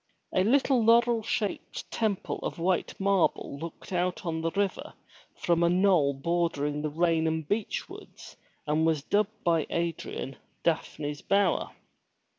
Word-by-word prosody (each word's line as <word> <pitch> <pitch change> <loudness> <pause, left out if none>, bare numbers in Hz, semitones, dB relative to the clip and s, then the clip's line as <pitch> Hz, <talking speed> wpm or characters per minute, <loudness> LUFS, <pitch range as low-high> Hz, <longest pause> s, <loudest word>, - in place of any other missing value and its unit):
A 185 - +3
little 260 +2 +3
laurel 235 0 +4
shaded 210 -1 -3
temple 215 -4 -1
of - - -4
white 175 +1 0
marble 195 -7 +1
looked 165 +3 -8
out 180 +1 -1
on 160 -1 -2
the 165 - 0
river 200 +2 -2 0.4
from 170 -1 +1
a 170 - +4
knoll 180 -6 +3
bordering 150 -1 -1
the 155 - -1
Raynham 160 0 +1
beechwoods 205 +7 -5 0.3
and 155 +2 +1
was 160 -3 +1
dubbed 210 +5 0
by 165 -2 +2
Adrian, 170 -5 -3 0.3
Daphne's 150 -3 -1
Bower. 200 -2 +1
170 Hz, 130 wpm, -28 LUFS, 160-200 Hz, 0.4 s, laurel